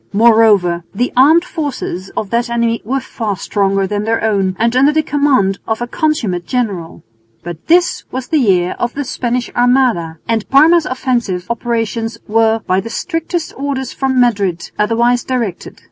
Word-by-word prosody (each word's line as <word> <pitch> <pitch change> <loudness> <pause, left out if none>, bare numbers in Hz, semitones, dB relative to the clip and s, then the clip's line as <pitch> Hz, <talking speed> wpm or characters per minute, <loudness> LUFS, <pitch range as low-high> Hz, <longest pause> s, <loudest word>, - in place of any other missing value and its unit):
Moreover 210 -6 +4
the 245 +4 -1
armed 310 +7 +5
forces 265 - -4
of 205 - -3
that 235 +1 0
enemy 235 -1 0
were 265 +6 -1
far 220 -6 -4
stronger 195 0 0
than 205 +2 -2
their 225 +1 -1
own 195 -4 +1
and 230 +2 +1
under 275 +3 +4
the 315 +1 +1
command 275 -11 +1
of 220 -1 -1
a 240 - -2
consummate 235 - -1
general. 205 -10 -3 0.4
But 170 -1 -8
this 345 +2 +3
was 255 0 -6
the 315 - +2
year 185 -7 +2
of 240 0 -2
the 285 - -2
Spanish 245 -1 -3
Armada, 245 -10 +2
and 225 -2 -1
Parma's 315 +4 +5
offensive 240 -8 -2
operations 230 -1 -2
were, 225 +1 +2
by 185 +1 +1
the 215 +4 -6
strictest 330 +4 -3
orders 270 -2 -3
from 265 -1 0
Madrid, 200 -8 0
otherwise 235 +3 +2
directed. 235 -8 -4
235 Hz, 160 wpm, -15 LUFS, 200-260 Hz, 0.4 s, armed